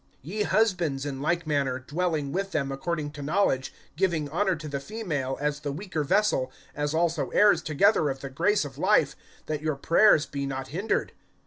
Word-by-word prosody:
(7)Ye 205 Hz, +6 st, -2 dB
husbands, 175 Hz, -12 st, +1 dB
in 135 Hz, -2 st, -4 dB
like 175 Hz, +3 st, 0 dB
manner, 140 Hz, -4 st, 0 dB
dwelling 150 Hz, +1 st, -2 dB
with 195 Hz, +3 st, -2 dB
them 140 Hz, -3 st, -1 dB
according 150 Hz, +2 st, -3 dB
to 150 Hz, -1 st, -9 dB
knowledge, 140 Hz, -4 st, +1 dB, 0.2 s
giving 170 Hz, -4 st, 0 dB
honor 185 Hz, +4 st, +1 dB
to 155 Hz, -1 st, -8 dB
the 140 Hz, -1 st, -3 dB
female, 145 Hz, -8 st, -3 dB
as 150 Hz, 0 st, -1 dB
the 145 Hz, -1 st, -4 dB
weaker 160 Hz, 0 st, -3 dB
vessel, 165 Hz, -6 st, +1 dB, 0.2 s
as 145 Hz, +1 st, -2 dB
also 165 Hz, -2 st, +1 dB
heirs 205 Hz, 0 st, +4 dB
together 160 Hz, 0 st, +3 dB
of 135 Hz, -1 st, -4 dB
the 135 Hz, -, -5 dB
grace 180 Hz, +6 st, +2 dB
of 140 Hz, 0 st, -9 dB
life; -, -, +3 dB, 0.3 s
that 155 Hz, -1 st, -3 dB
your 155 Hz, -1 st, -1 dB
prayers 165 Hz, +2 st, +4 dB
be 140 Hz, -1 st, -4 dB
not 135 Hz, -1 st, -4 dB
hindered. 190 Hz, +9 st, -1 dB
155 Hz, 185 wpm, -27 LUFS, 140-180 Hz, 0.3 s, heirs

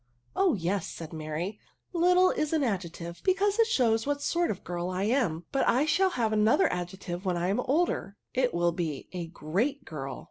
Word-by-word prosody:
" -, -, -47 dB
Oh 380 Hz, -3 st, +3 dB
yes," 185 Hz, 0 st, -1 dB
said 165 Hz, -1 st, -8 dB
Mary, 160 Hz, +6 st, -4 dB, 0.2 s
" -, -, -46 dB
little 360 Hz, +2 st, +5 dB
is 305 Hz, -1 st, -1 dB
^ 305 Hz, -4 st, +2 dB
ad« 200 Hz, -6 st, 0 dB
jective, 170 Hz, 0 st, -8 dB
because 395 Hz, +3 st, +2 dB
it 455 Hz, -, +5 dB
shows 230 Hz, -, +2 dB
what 290 Hz, 0 st, 0 dB
sort 340 Hz, +4 st, 0 dB
of 200 Hz, -, -1 dB
a -, -, -26 dB
girl 175 Hz, +1 st, -3 dB
If 185 Hz, -, -3 dB
ADJECTIVES. 215 Hz, +4 st, +2 dB
29 -, -, +4 dB
I -, -, +3 dB
am; 165 Hz, 0 st, -5 dB
but 275 Hz, -, +1 dB
I 265 Hz, +5 st, +4 dB
shall 375 Hz, +5 st, +3 dB
have 230 Hz, -10 st, 0 dB
another 215 Hz, -1 st, +4 dB
adjective 180 Hz, 0 st, -5 dB
when 180 Hz, -3 st, 0 dB
I 175 Hz, +1 st, 0 dB
am 200 Hz, -, +1 dB
older; 270 Hz, -, 0 dB, 0.2 s
it 250 Hz, -1 st, +2 dB
will 175 Hz, 0 st, +2 dB
be 165 Hz, -5 st, -4 dB
a 175 Hz, -2 st, -4 dB
great 205 Hz, -, -2 dB
girl. 135 Hz, -5 st, -6 dB
205 Hz, 235 wpm, -29 LUFS, 175-290 Hz, 0.2 s, little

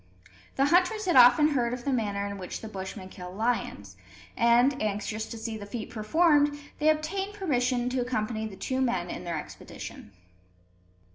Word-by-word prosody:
The 275 Hz, -, +3 dB
hunters 365 Hz, +7 st, +3 dB
had 355 Hz, -, +1 dB
often 250 Hz, +4 st, +7 dB
heard 245 Hz, -4 st, 0 dB
of 245 Hz, -, -11 dB
the 280 Hz, -, +1 dB
manner 205 Hz, -4 st, -1 dB
in 200 Hz, 0 st, -5 dB
which 180 Hz, -, -6 dB
the 220 Hz, -, -7 dB
Bushmen 190 Hz, -1 st, -7 dB
kill 180 Hz, -1 st, -9 dB
lions; 195 Hz, -, -2 dB, 0.4 s
and, 240 Hz, +4 st, +4 dB
anxious 215 Hz, +1 st, -2 dB
to 230 Hz, -, -7 dB
see 225 Hz, 0 st, -5 dB
the 205 Hz, -1 st, -9 dB
feat 215 Hz, +1 st, -6 dB
performed, 290 Hz, +6 st, +3 dB, 0.2 s
they 305 Hz, +1 st, +4 dB
obtained 385 Hz, +7 st, -1 dB
permission 250 Hz, -10 st, 0 dB
to 255 Hz, 0 st, 0 dB
accompany 220 Hz, -2 st, -2 dB
the 200 Hz, -, -9 dB
two 260 Hz, +6 st, -2 dB
men 210 Hz, -9 st, 0 dB
on 180 Hz, -, -6 dB
their 170 Hz, -2 st, -2 dB
expedition. 105 Hz, -, -9 dB
240 Hz, 170 wpm, -28 LUFS, 205-285 Hz, 0.4 s, often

